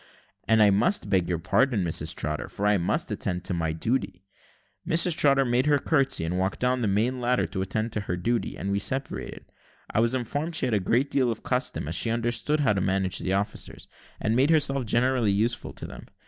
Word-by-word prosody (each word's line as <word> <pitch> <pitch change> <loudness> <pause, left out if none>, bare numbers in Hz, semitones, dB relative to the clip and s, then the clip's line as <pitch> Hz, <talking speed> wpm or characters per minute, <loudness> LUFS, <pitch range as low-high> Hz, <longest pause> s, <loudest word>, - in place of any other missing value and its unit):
"And 110 -1 +5
I 105 - +5
must 150 - +1
beg 90 -3 +2
your 85 - 0
pardon, 105 +5 +1
Mrs 85 -2 0
Trotter, 75 0 -3
for 100 - -4
I 105 -1 +3
must 85 - -1
attend 90 -1 -3
to 95 - -2
my 80 -2 -1
duty." 95 +2 -2 0.6
Mrs 170 0 +3
Trotter 140 -3 +3
made 125 +3 +1
her 145 -1 +4
curtsy 135 - +1
and 90 +3 -2
walked 95 +1 -1
down 125 0 +1
the 110 - +1
main 115 +6 0
ladder 125 +1 +1
to 95 -1 -4
attend 110 +4 -2
to 110 - -2
her 90 -3 -3
duty, 115 +6 -1
and 100 - -3
we 100 - +1
separated. 135 +6 -3 0.5
I - - +1
was 115 +3 +2
informed 145 +7 -3
she - - +1
had 120 - -1
a 105 - +3
great 120 +9 +1
deal 130 -3 +2
of 115 -1 -4
custom, 125 - -1
as 80 - -3
she 115 - -1
understood 120 +6 0
how 120 -7 +3
to 100 - -1
manage 95 0 0
the 95 - -2
officers, 100 +1 -3 0.3
and 110 +1 0
made 135 +4 +3
herself 140 -5 +2
generally 120 -1 +2
useful 110 +4 -1
to - - -8
them. - - -10
115 Hz, 215 wpm, -26 LUFS, 95-130 Hz, 0.6 s, And